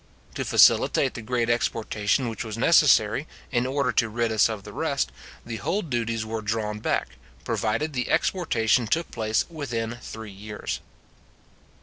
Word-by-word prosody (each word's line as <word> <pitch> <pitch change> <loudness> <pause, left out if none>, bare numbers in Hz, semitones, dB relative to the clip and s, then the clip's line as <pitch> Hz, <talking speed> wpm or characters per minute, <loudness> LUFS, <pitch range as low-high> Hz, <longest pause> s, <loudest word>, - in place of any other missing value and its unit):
To - - -3
facilitate - - +4
the - - -6
great 120 +1 -1
exportation 115 0 0
which 115 +1 -4
was 110 -1 -6
necessary, - - +4 0.2
in 120 +1 +1
order 140 -1 0
to 115 - +1
rid 115 +1 -1
us 110 0 +4
of 110 -3 -5
the - - -10
rest, - - -1 0.3
the 115 -1 -5
whole 190 - -1
duties 115 -6 -2
were 110 0 -4
drawn 105 0 -2
back, - - -2 0.3
provided 115 +8 -1
the 125 -2 -2
exportation 120 - +2
took 165 +8 0
place 110 -1 0
within 120 -8 -4
three 110 -3 -8
years. 105 +2 -5
115 Hz, 150 wpm, -25 LUFS, 110-125 Hz, 0.3 s, facilitate